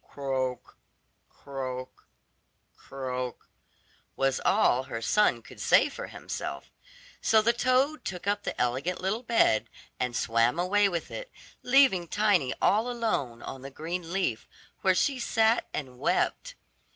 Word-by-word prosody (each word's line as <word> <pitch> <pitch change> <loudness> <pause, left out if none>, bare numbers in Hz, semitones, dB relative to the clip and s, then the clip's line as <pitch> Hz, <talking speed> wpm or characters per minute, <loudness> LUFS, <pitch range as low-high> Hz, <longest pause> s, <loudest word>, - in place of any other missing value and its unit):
"Croak, 130 -3 -4 0.5
croak, 130 -2 -7 0.7
croak," 125 -2 -6 0.7
was 135 -1 +1
all 130 +2 +3
her 115 - -5
son 210 - +2
could - - -14
say - - +5
for - - -7
himself; - - -6 0.5
so 220 - +4
the 230 +2 +3
toad 255 +5 +1
took 180 -1 -5
up 205 0 0
the - - -5
elegant 130 +9 0
little 195 +5 -1
bed, 230 - +2 0.3
and 125 -1 -1
swam 115 +4 +2
away 200 +3 +3
with 170 -3 -4
it, - - -7 0.3
leaving 250 -10 +4
Tiny 205 -10 +2
all 220 +4 +3
alone 215 - -2
on 135 - -7
the 135 - -7
green 165 +4 -5
leaf, 180 - -1 0.3
where 190 -1 +3
she 270 +6 +1
sat 225 -1 +2
and 130 -4 -6
wept. - - 0
175 Hz, 135 wpm, -28 LUFS, -, 0.7 s, say